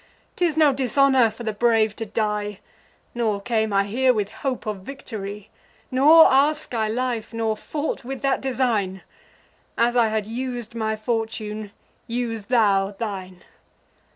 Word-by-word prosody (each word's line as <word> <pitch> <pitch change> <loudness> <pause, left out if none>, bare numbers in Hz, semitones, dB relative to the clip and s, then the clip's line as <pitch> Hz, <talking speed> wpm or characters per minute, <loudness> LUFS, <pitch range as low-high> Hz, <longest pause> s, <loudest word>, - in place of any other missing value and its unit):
'Tis 340 -4 0
no 300 -3 +5
dishonour 265 -1 +3
for 225 +3 -10
the 220 -2 -2
brave 220 -1 +2
to 225 - -5
die, 210 -1 -2 0.5
Nor 220 -4 0
came 220 0 0
I 195 0 +3
here 250 +5 +2
with 205 -2 -2
hope 265 -3 -4
of 215 -2 -3
victory; 210 -2 -8 0.4
Nor 300 +6 +7
ask 290 +1 +2
I 220 -2 0
life, 235 0 -2
nor 225 -1 0
fought 295 +7 -4
with 265 +2 -6
that 275 -1 +1
design: 230 -8 -1 0.7
As 240 +1 +2
I 235 -2 +4
had 215 -1 -1
us'd 240 0 -5
my 220 -1 -1
fortune, 215 -2 -3 0.4
use 230 -3 -3
thou 200 -5 +2
thine. 190 -5 -6
225 Hz, 145 wpm, -23 LUFS, 210-255 Hz, 0.7 s, Nor